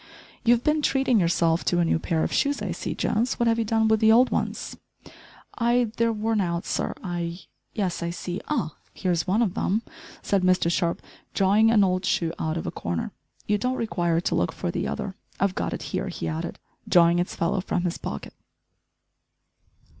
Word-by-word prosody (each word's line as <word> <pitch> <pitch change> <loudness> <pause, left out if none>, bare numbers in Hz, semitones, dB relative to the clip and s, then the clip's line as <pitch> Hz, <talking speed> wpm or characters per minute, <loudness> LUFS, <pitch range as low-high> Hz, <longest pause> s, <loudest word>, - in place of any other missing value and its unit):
"You've 240 +1 +4
been 300 0 +2
treating 270 -5 +2
yourself 170 -1 +2
to 175 - +2
a 175 - +3
new 165 - +2
pair 160 -1 0
of - - -2
shoes, 285 0 +1
I - - -3
see, - - -4
Jones, 235 +4 0
what 235 - +2
have 230 0 +2
you - - +2
done 220 +1 +2
with 220 0 +3
the 220 0 +5
old 245 +3 +5
ones?" - - -2 0.8
"I 240 -1 +2
they're 230 0 +3
worn 220 0 0
out, 170 -2 -2
sir - - -2
I 175 0 -4 0.2
" - - -45
"Yes, 190 -5 -1
I 170 - -1
see 175 +1 -5
ah! 285 - -1 0.2
here 185 - -1
is 170 +1 0
one 210 +6 +3
of 195 -6 -1
them," 215 +5 0 0.4
said 200 -2 +1
Mr 185 -2 +3
Sharp, 170 0 0 0.3
drawing 205 +3 +4
an 215 -3 +5
old 185 0 +1
shoe 165 -3 0
out 160 +1 -1
of 165 - -4
a - - -2
corner; 85 -1 -3 0.3
"you 210 0 +1
don't 250 +4 0
require 175 -7 0
to 170 - -1
look 170 - +1
for 175 - -3
the - - -2
other, 195 - -4 0.3
I've 195 -1 +2
got - - -2
it - - -4
here," - - -1
he 80 - -4
added, 80 0 -4 0.3
drawing 170 0 +5
its 175 - -2
fellow 170 +3 0
from 180 -1 -1
his 175 -2 -2
pocket. 70 - -6
185 Hz, 205 wpm, -25 LUFS, 170-225 Hz, 0.8 s, the